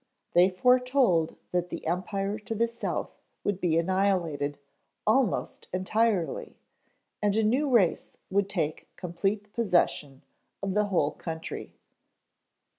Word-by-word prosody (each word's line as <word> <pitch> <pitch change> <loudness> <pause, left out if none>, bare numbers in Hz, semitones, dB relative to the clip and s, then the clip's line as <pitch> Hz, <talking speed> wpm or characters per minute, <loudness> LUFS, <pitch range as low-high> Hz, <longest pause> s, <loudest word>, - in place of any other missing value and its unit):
They 180 +2 +6
foretold 250 - +3 0.2
that 180 0 0
the - - -6
Empire 195 +4 -1
to 220 +2 -5
the 230 +2 +3
south 235 0 -3 0.3
would 205 -2 -1
be 165 -3 +2
annihilated 170 -5 +1 0.5
almost 225 0 +1
entirely 195 0 0 0.6
and 205 -1 +2
a 220 - +3
new 260 +7 +2
race 215 -9 +3 0.2
would 200 0 +2
take 160 -6 -2
complete 195 +4 -2
possession 175 - +1 0.4
of 195 -1 -1
the 210 +1 +3
whole 170 -7 +1
country." 160 -1 -6
195 Hz, 115 wpm, -28 LUFS, 175-215 Hz, 0.6 s, They